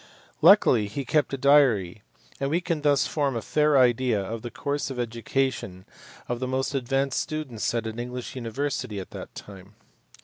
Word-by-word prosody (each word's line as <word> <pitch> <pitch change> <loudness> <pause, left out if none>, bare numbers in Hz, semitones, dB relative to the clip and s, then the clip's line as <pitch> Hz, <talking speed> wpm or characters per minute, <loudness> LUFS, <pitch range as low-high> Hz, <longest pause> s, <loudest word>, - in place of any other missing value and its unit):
Luckily 155 - +6
he 130 +7 -5
kept 150 +3 +1
a 135 - -2
diary, 125 -9 +3 0.4
and 135 - -1
we 165 +4 +1
can 170 -4 -2
thus 145 -2 +3
form 140 -4 -1
a 115 - -2
fair 150 -1 +2
idea 125 -3 +3
of 110 +4 -5
the 120 - -6
course 145 +4 -3
of 135 - -6
education 115 -4 -2 0.4
of 120 0 -3
the 130 - -2
most 130 +2 -1
advanced 135 +1 0
students 155 -8 -3
at 115 -1 -1
an 110 +1 -5
English 125 +1 -6
university 125 -2 -3
at 95 - -9
that - - -9
time. 100 0 -12
130 Hz, 175 wpm, -26 LUFS, 115-140 Hz, 0.4 s, Luckily